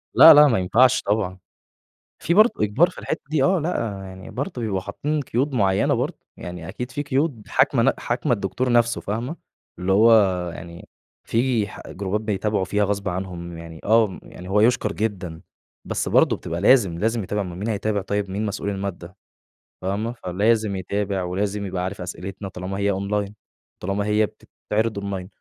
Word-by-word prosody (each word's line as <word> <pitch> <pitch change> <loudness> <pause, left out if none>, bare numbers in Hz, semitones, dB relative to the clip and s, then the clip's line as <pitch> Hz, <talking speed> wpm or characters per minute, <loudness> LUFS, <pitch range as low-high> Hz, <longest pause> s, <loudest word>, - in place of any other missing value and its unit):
لأ 165 - +11
لأ، 150 0 +8
ما 115 -7 +2
ينفعش 125 +8 +4
طبعًا. 95 -3 -1 0.8
في 170 - 0
برضه 215 +4 +6
إجبار 145 - +3
في - - -16
الحِتّه - - -3
دي 155 -4 +2
آه، 185 +2 +3
لأ، 160 +2 -2 0.4
يعني 95 0 -10
برضه 125 -2 -4
بيبقوا 100 -4 -1
حاطِّين 145 +10 -2
قُيود 135 +2 -1
مُعيّنة 95 -4 +2
برضه، - - -2 0.2
يعني 90 -1 -8
أكيد 125 +6 -5
في 145 - -3
قُيود 140 -4 -1
حاكمة 130 -2 +3
ن - - +4
حاكمة 125 +3 -1
الدكتور 120 +4 -1
نَفْسُه 120 -1 +3
فاهمة، 120 - -4 0.4
اللي 95 +1 0
هو 115 +4 +6 0.4
يعني 85 -1 -10 0.4
في 115 -3 +1
ح - - -10
جروبات 100 +2 -2
بيتابعوا 105 -2 -1
فيها 105 +2 +1
غصب 100 0 -1
عنهم 90 -2 -5
يعني 80 -1 -10
آه، 110 -3 +3
يعني 90 +1 -11
هو 105 +2 +3
يُشكَر 110 -2 +3
جدًا، 95 -6 -3 0.4
بس - - -2
برضه - - +4
بتبقى 85 +1 -5
لازم، 100 -7 +4
لازم 115 +2 0
يتابع 105 +2 -2
أُمَّال 90 -1 -7
مين 105 +4 -3
هيتابع 105 -1 -1
طيب، 100 0 -2
مين 105 +3 -2
مسؤول 100 0 -3
المادَّة 95 -2 -5 0.7
فاهمة، 100 +5 -2
فلازم 105 +1 0
يتابع 95 0 -2
ولازم 100 +3 -2
يبقى 90 -1 -3
عارف 95 0 -4
أسئلتنا، 95 +2 -6
طالما 95 +2 -5
هي 100 0 +1
Online 100 +1 -2 0.5
طالما 100 +2 -2
هي 105 0 +3
بتتعرض 110 0 -3
Online 95 -2 -4
105 Hz, 170 wpm, -23 LUFS, 95-115 Hz, 0.8 s, لأ